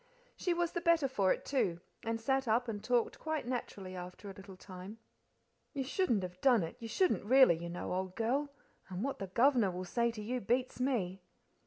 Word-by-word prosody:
She 360 - -1
was 345 -1 +1
the 345 - -2
better 335 -4 +4
for 200 -8 +2
it, - - -1
too, 185 -11 0 0.2
and 225 0 -2
sat 265 +2 0
up 235 +3 +2
and 210 -3 -4
talked 245 -2 +1
quite 315 -4 -2
naturally 200 -7 -4
after 180 +3 -8
a - - -10
little 195 0 -11
time. 185 +3 -9 0.8
"You 275 -3 -1
shouldn't 260 - +1
have 180 0 -7
done 250 -6 +5
t 165 - -4
you 230 - -6
shouldn't 365 - +2
really, 255 -6 +6
you 170 - -5
know, 175 +1 -4
old 185 0 -3
girl, 270 +6 0 0.4
and 185 +2 -4
what 275 +1 -2
the 195 - -4
governor 235 +1 +4
will 180 0 -5
say 235 +6 +1
to 225 -2 -6
you 250 +4 -2
beats 250 +5 0
me." 200 -8 0
230 Hz, 205 wpm, -34 LUFS, 190-265 Hz, 0.8 s, really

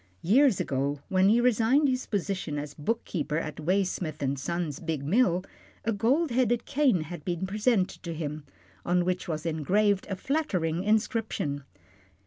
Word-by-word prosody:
Years 245 - +4
ago, 140 +2 -1
when 190 0 +4
he 225 +3 +5
resigned 250 +4 +3
his 255 -1 -1
position 190 -6 -2
as 145 0 -5
bookkeeper 155 -2 -2
at 155 -3 -4
Waysmith 175 -3 -1
and 135 0 -1
Son's 165 0 -3
big 160 -5 -3
mill, 185 - +3 0.4
a 225 - +2
gold 260 +9 +2
headed 240 -1 +1
cane 275 - +2
had 155 0 -7
been 175 +2 -2
presented 210 0 0
to 170 -2 -5
him, 150 -1 -4 0.4
on 175 0 +1
which 180 0 -1
was 155 -1 -3
engraved 195 +6 +1
a 195 - -1
flattering 185 - -1
inscription. 210 - 0
185 Hz, 150 wpm, -28 LUFS, 155-225 Hz, 0.4 s, he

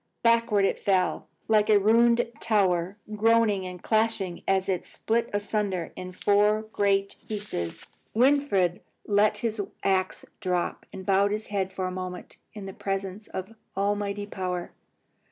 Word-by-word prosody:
Backward 230 -3 +4
it - - 0
fell, 185 -2 +1 0.2
like 215 -1 +3
a 210 - +7
ruined 235 +3 +4
tower, 190 -3 +1 0.2
groaning 215 -3 +3
and 180 -1 -9
crashing 220 -5 0
as 190 0 +2
it 185 -2 0
split 230 +1 -1
asunder 205 -4 -1
in 185 0 -7
four 210 +3 +3
great 200 -2 0
pieces. 205 - -4 0.3
Winfried 230 -8 +3 0.2
let 205 0 +3
his 220 -2 0 0.2
axe 190 -1 0
drop, 180 -4 -2
and 190 - -8
bowed 195 +1 +3
his 215 +1 -2
head 190 -1 0
for 190 0 -3
a 185 - -2
moment 185 -1 -6 0.2
in 205 -2 -7
the 195 - -7
presence 195 +1 -4
of 190 +4 -6 0.2
almighty 205 0 -1
power. 180 -3 -4
200 Hz, 140 wpm, -27 LUFS, 185-215 Hz, 0.3 s, a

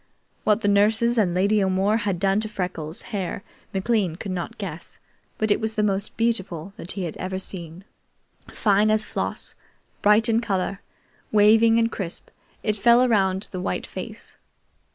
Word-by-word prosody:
What 215 +1 +3
the 205 - 0
nurses 220 +4 +3
and 180 -5 +2
Lady 200 +2 +3
O'More 190 +3 +2
had 205 -5 -1
done 195 +2 +2
to 215 0 -3
Freckles' 180 -5 -4
hair 195 -1 -3 0.3
McLean 195 -3 0
could 195 +2 -6
not 180 -2 -4
guess, - - -7 0.4
but 215 -1 0
it - - +3
was 220 0 -2
the 215 - +1
most 200 0 -1
beautiful 195 -6 -1
that 175 - -4
he 190 -3 -3
ever 185 +3 -5
had 190 - -2
seen. 170 -1 -8 0.7
Fine 210 0 +2
as 215 0 +2
floss, - - -4 0.5
bright 210 +3 +5
in 225 0 +3
color, 195 -2 -2 0.5
waving 220 +2 +5
and 230 0 +2
crisp, 180 -4 -6 0.3
it 215 - +1
fell 235 +4 +5
around 195 -5 +2
the 185 - -4
white - - -2
face. - - -7
205 Hz, 165 wpm, -24 LUFS, 185-220 Hz, 0.7 s, bright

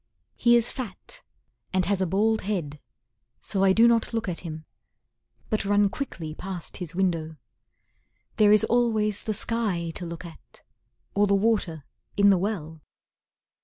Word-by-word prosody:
He 235 0 +4
is 235 -1 +3
fat 255 - -8 0.5
and 185 -1 +1
has 200 -1 0
a 190 - +1
bald 215 +5 +1
head, 170 -8 -3 0.6
So 195 -2 -1
I 195 - +5
do 225 +5 +6
not 230 0 +2
look 225 -2 -2
at 175 -2 -3
him, 155 -2 -8 0.9
But 215 - 0
run 205 0 +3
quickly 175 - -6
past 180 0 -6
his 175 -1 -6
window. 165 -4 -1 1.0
There 210 -2 +5
is 215 - +6
always 220 -4 +1
the 215 - -2
sky 195 -8 -1
to 175 0 -5
look 170 +1 -7
at, 165 -2 -14 0.5
Or 205 +1 +3
the 200 - +3
water 195 -8 0 0.3
in 200 0 +6
the 190 - +3
well! 165 -6 -4
195 Hz, 155 wpm, -26 LUFS, 170-220 Hz, 1.0 s, do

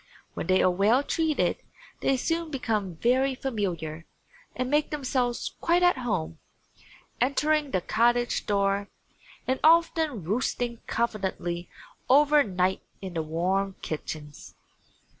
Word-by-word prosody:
When - - -5
they 185 0 +4
are 185 - +4
well 210 +9 +3
treated 315 0 0 0.4
they 270 - +1
soon 330 +5 -1
become 215 - -2
very 260 +8 +2
familiar 175 -11 -3 0.5
and 255 0 -2
make 295 +3 +1
themselves 255 -4 -1
quite 345 +1 +3
at 355 -6 +4
home, 80 - -2 0.8
entering 295 +3 +2
the 185 -7 0
cottage 240 +5 +1
door 200 0 +1 0.6
and 260 0 0
often 320 - +3
roosting 235 +4 -1
confidently 190 -6 -2 0.4
over 295 +2 +6
night 185 -5 0 0.2
in 190 -2 -7
the 165 - -1
warm 185 +5 -1
kitchens. 150 -1 -7
235 Hz, 120 wpm, -27 LUFS, 185-275 Hz, 0.8 s, over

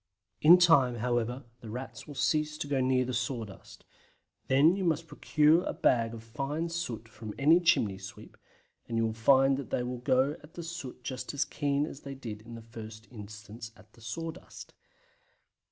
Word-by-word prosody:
In 170 +4 +9
time, 155 -9 +5
however, 120 +2 -1 0.2
the 115 - -10
Rats 120 0 -7
will 145 - -9
cease 150 +2 +1
to 145 - -4
go 140 -2 +1
near 130 0 +1
sawdust. 115 -4 -5 0.6
Then 145 +7 +5
you 195 - -2
must 165 -2 +1
procure 155 +1 +3
a - - -2
bag 115 -2 +2
of 110 - -10
fine 140 +8 -3
soot 125 -10 -4
from 110 -1 -9
any 155 +5 +6
chimney 110 - +2
sweep, - - -11 0.5
and 115 - -2
you 115 - +2
will 110 - -1
find 135 +4 +4
that 140 - -6
they 125 - 0
will 125 0 -4
go 130 +4 +2
at 150 +1 -17
the 170 - -6
soot 160 -7 -7
just 130 +2 -5
as 145 - +1
keen 145 0 0
as 140 - -8
they 140 -1 -8
did 110 -5 -7
in 115 +1 -10
the 115 - -10
first 110 -1 -10
instance 105 +1 -9
at 105 0 -20
the 115 - -19
sawdust. 165 +7 -7
130 Hz, 185 wpm, -30 LUFS, 115-150 Hz, 0.6 s, In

